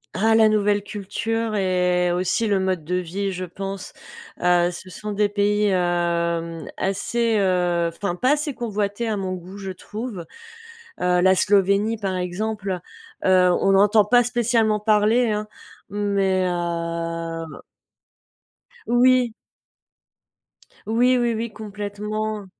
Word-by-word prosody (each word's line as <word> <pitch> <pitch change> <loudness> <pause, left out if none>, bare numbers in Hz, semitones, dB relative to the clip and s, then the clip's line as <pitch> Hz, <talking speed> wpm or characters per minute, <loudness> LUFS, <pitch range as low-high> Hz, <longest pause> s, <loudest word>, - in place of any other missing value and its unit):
Ah 220 +4 +3
la 220 -1 +6
nouvelle 205 -1 +2
culture 215 +3 -3
et 180 -2 +1
aussi, 185 +5 0
le 200 -2 +2
mode 185 -3 -1
de 180 +4 -2
vie, 185 +3 -2
je 185 0 -4
pense. 195 +2 -7 0.5
Heu, 175 0 +3
ce 185 +2 -9
sont 210 +4 -6
des 205 0 +1
pays, 205 +1 +1
hem, 170 -2 0
assez, 225 +4 0
heu, 180 -3 +1
enfin, 200 0 -3
pas 255 +9 +2
assez 295 -2 -2
convoités 210 -1 -2
à 215 -2 -1
mon 190 -1 -3
goût, 185 +2 -9
je 195 -1 -6
trouve. 210 0 -7 0.8
Heu, 180 0 +2
la 190 +1 +5
Slovénie 200 +3 +2
par 195 -3 -3
exemple, 190 +1 -3 0.4
heu, 185 -1 +5
on - - +2
n'entend 205 +2 +5
pas 245 +3 +4
spécialement 230 -3 +1
parler, 215 +3 +3
hein. 210 0 -2 0.4
Mais, 195 -2 +1
heu 170 -1 -4 1.3
Oui. 245 -1 +4 1.5
Oui, 245 +3 +3
oui, 240 -1 +1
oui 225 0 -3
complètement. 210 0 -5
200 Hz, 125 wpm, -22 LUFS, 180-215 Hz, 1.5 s, la